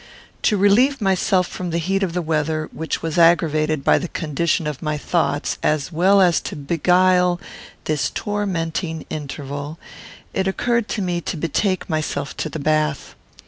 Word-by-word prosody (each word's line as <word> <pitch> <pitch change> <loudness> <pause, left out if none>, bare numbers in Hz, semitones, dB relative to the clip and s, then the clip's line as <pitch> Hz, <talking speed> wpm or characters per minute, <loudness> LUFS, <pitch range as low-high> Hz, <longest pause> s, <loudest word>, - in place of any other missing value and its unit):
To 210 - +2
relieve 235 +8 +4
myself 190 -2 +2
from 180 0 -5
the 165 - -1
heat 190 +4 0
of 185 -4 -1
the 180 0 -1
weather, 155 0 -1
which 160 0 -4
was 165 +1 -1
aggravated 155 -3 +3
by - - +4
the 180 - -4
condition 165 +1 -1
of 150 -3 -4
my 150 -1 -1
thoughts, 150 -1 -1
as 150 +2 0
well 190 +5 +4
as 175 -3 +4
to - - -6
beguile 180 +4 +2 0.4
this 150 -3 0
tormenting 170 -5 -3
interval, 145 0 -5 0.6
it 190 0 0
occurred 235 +3 0
to 205 - -2
me 175 -1 -1
to 170 - -4
betake 185 +5 -1
myself 150 -3 -2
to 155 - -2
the 160 - -5
bath. 155 0 0
165 Hz, 160 wpm, -21 LUFS, 155-185 Hz, 0.6 s, relieve